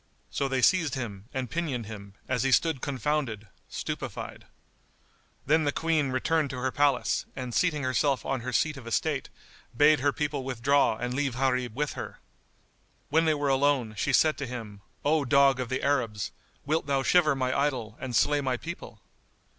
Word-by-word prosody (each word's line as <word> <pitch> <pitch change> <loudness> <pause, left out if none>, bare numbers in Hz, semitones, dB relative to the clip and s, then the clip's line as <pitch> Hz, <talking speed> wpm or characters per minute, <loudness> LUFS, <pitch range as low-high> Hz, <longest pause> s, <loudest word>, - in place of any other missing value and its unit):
So 140 - -1
they 130 -2 -1
seized 160 -4 +3
him 105 -7 -5
and 130 -2 -3
pinioned 140 -7 -2
him, 100 -2 -9
as 125 - 0
he 135 +2 +1
stood 160 -2 +2
confounded, 135 -6 -2 0.2
stupefied. - - -5 1.0
Then 155 +3 +3
the 145 - +1
Queen 160 -2 +1
returned 145 +4 +1
to 130 - -5
her 130 +1 -1
palace, 145 -2 +1
and 125 -2 -5
seating 150 -3 +1
herself 130 +1 +1
on 135 -2 -1
her 125 +2 -4
seat 155 +2 +1
of 125 -3 -10
estate, 140 +4 -1 0.5
bade 150 +1 +6
her 145 +2 +2
people 145 -1 -2
withdraw 130 -1 +2
and 125 +2 -3
leave 135 -2 -1
Gharib 125 -3 0
with 150 +1 -1
her. - - -7 0.9
When 160 +3 +3
they 155 -1 +3
were 145 -1 -1
alone, 135 -4 +2
she - - 0
said 155 -3 +3
to 140 - -3
him, 110 -5 -7 0.2
"O 150 0 +3
dog 140 0 +4
of 125 -2 -3
the 130 - -2
Arabs, 120 -7 0 0.3
wilt 155 +1 0
thou 135 -1 +1
shiver 155 -2 +4
my 130 -1 -1
idol 130 -7 -1
and 130 -2 -4
slay 145 +5 +3
my 130 -2 -1
people?" 120 -9 -8
135 Hz, 180 wpm, -28 LUFS, 125-145 Hz, 1.0 s, bade